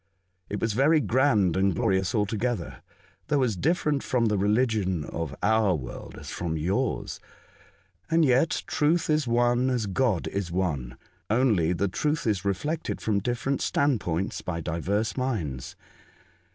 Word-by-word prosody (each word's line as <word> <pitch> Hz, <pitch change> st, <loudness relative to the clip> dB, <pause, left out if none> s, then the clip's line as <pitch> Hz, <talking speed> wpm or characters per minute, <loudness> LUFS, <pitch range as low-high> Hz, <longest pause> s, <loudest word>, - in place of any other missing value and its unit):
It 105 Hz, -, -3 dB
was 115 Hz, -2 st, 0 dB
very 145 Hz, +7 st, +4 dB
grand 110 Hz, -, +2 dB
and 95 Hz, -1 st, +2 dB
glorious 95 Hz, +6 st, +1 dB
altogether, 105 Hz, -, -1 dB, 0.5 s
though 145 Hz, -2 st, +2 dB
as 115 Hz, -5 st, 0 dB
different 150 Hz, -, +1 dB
from 120 Hz, -2 st, 0 dB
the 105 Hz, -, +1 dB
religion 105 Hz, -, +1 dB
of 80 Hz, -4 st, -5 dB
our 110 Hz, -4 st, +3 dB
world 65 Hz, -5 st, -8 dB
as -, -, -8 dB
from 80 Hz, -2 st, -3 dB
yours. 100 Hz, +11 st, -1 dB, 0.9 s
And 165 Hz, -1 st, +4 dB
yet 130 Hz, +4 st, +2 dB
truth 155 Hz, +2 st, +1 dB
is 150 Hz, -3 st, +1 dB
one 120 Hz, +2 st, +2 dB
as 125 Hz, -4 st, 0 dB
God 105 Hz, -2 st, 0 dB
is 95 Hz, -3 st, -3 dB
one, 75 Hz, -9 st, -2 dB, 0.3 s
only 110 Hz, -8 st, +3 dB
the 95 Hz, +3 st, 0 dB
truth 150 Hz, -, -1 dB
is 105 Hz, -5 st, 0 dB
reflected 145 Hz, -, -2 dB
from 105 Hz, -2 st, 0 dB
different 120 Hz, +5 st, -2 dB
standpoints 100 Hz, -, 0 dB
by 85 Hz, -2 st, -4 dB
divers 95 Hz, +7 st, -1 dB
minds. 90 Hz, -, -3 dB
105 Hz, 140 wpm, -26 LUFS, 90-130 Hz, 0.9 s, very